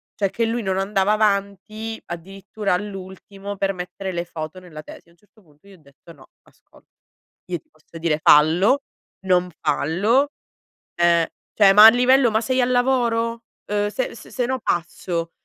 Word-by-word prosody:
cioè 200 -2 0
che 230 - -1
lui 230 +1 -2
non 190 -3 -2
andava 195 +1 +1
avanti, 215 +1 -2
addirittura 195 +4 -5
all'ultimo 195 +1 -6
per 195 0 -1
mettere 185 +1 -6
le 170 -1 -3
foto 160 +1 -7
nella 155 -4 -11
tesi. - - -13
A - - -23
un 170 - -28
certo 210 +3 -27
punto 150 -1 -28
gli 200 - -16
ho 190 - -17
detto: 140 +4 -18
“No, 145 -5 -17 0.2
ascolta, - - -25 0.6
io 175 - -2
ti - - -32
posso 155 +1 -15
dire: 160 -2 -1
fallo, 175 - +4 0.4
non 180 -1 +2
fallo. 195 - +1 0.7
Ehm, 170 -1 +3 0.3
cioè 200 -2 +5
ma 210 +2 +9
a - - +12
livello 250 +1 +3
ma 220 - +1
sei 255 +3 0
al 250 +1 +1
lavoro? 235 -2 0 0.2
Ehm, 205 0 -1
se 235 +3 -4
s - - -13
sennò 255 +1 -2
passo, 170 0 -3
195 Hz, 170 wpm, -21 LUFS, 175-225 Hz, 0.7 s, a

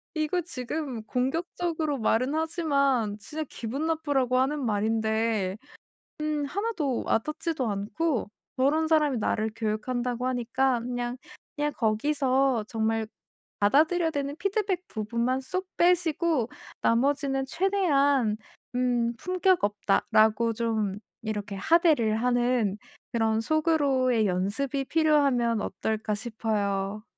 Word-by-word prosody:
이거 310 +3 0
지금 270 -5 -4
공격적으로 315 +4 -1
말은 240 +5 +1
하지만 280 -9 +1
진짜 300 +9 -5
기분 255 +7 -4
나쁘라고 285 -6 +1
하는 275 +3 +1
말인데 220 -2 0 0.6
음 305 -1 -1
1 405 +10 -2
도 280 - -1
와닿지도 305 +2 -1
않고" 225 +8 -1 0.3
저런 300 +5 +2
사람이 300 -4 +3
나를 220 0 0
교육한다고 240 +3 -2
하니까 250 +1 +1
그냥 245 0 -3 0.4
그냥 295 -1 0
거기서 260 +1 +1
정말 225 -1 0 0.5
받아들여야 320 - +3
되는 285 -1 -3
피드백 390 -1 -1
부분만 235 +4 -1
쏙 370 +8 -3
빼시고 335 -7 +2 0.3
나머지는 270 +2 +1
최대한 285 - +2 0.4
"음 240 -2 +1
품격 365 - +1
없다."라고 215 +2 +2
좀 215 -3 -1 0.2
이렇게 205 -2 -4
하대를 295 - +3
하는 245 -3 +1 0.4
그런 225 -1 +1
'속으로의 275 -5 +2
연습이 220 +10 -1
필요하면 275 -8 +2
어떨까?' 215 -1 -2
싶어요. 210 -2 -2
255 Hz, 260 characters per minute, -27 LUFS, 220-305 Hz, 0.6 s, 사람이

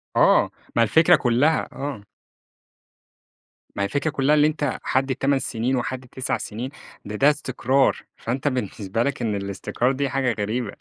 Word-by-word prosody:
آه، - - +4 0.2
ما 115 - +5
الفكرة 160 +9 +5
كلها، 130 +6 +2
آه. 135 -7 -5 1.7
ما 100 - -1
هي - - +2
الفكرة 145 +7 -1
كلها 145 +2 +2
اللي 150 0 +5
أنت 150 -1 -2
حد 130 0 0
8 135 0 +1
سنين 125 +1 -1
وحد 130 0 -3
9 130 +1 -2
سنين، 115 +5 -5 0.4
ده 105 +1 -5
ده 140 +6 +5
استقرار، 135 -2 +1 0.2
فأنت 130 +5 -3
بالنسبة 115 -4 -1
لك 140 - -2
إن 110 -3 0
الاستقرار 100 +6 -1
دي 135 0 -1
حاجة 130 -4 0
غريبة 115 +4 -2
130 Hz, 155 wpm, -23 LUFS, 115-140 Hz, 1.7 s, ما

